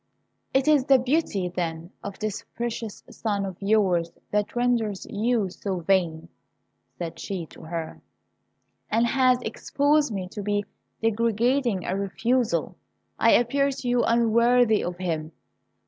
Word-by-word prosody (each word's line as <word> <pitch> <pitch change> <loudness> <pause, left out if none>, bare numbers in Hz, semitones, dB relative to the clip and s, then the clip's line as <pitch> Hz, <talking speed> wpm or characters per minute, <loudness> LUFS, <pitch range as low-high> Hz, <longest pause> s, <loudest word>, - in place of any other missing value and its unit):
"It 265 +2 +2
is 295 -4 +4
the 275 -1 +6
beauty, 250 - 0
then, 170 -1 -4
of 200 -1 -6
this 215 -2 -3
precious 235 -2 -4
son 205 -3 -2
of 190 -2 -5
yours 190 -5 +2 0.2
that 210 +2 0
renders 235 -5 0
you 215 -2 0
so 190 -1 -4
vain," 170 -3 +1 0.7
said 170 -2 -5
she 185 -4 -4
to - - -13
her, 165 -1 -5 0.9
"and 230 +2 +3
has 255 0 +3
exposed 285 +5 +1
me 190 -3 -3
to 205 - -6
so 205 0 0 0.4
degrading 230 -1 +1
a 185 - -1
refusal! 230 +5 0 0.4
I - - +5
appear 275 +4 +3
to 265 -2 -5
you 245 0 +3
unworthy 235 0 +4
of 175 0 -4
him. 160 -3 -3
215 Hz, 135 wpm, -25 LUFS, 185-245 Hz, 0.9 s, the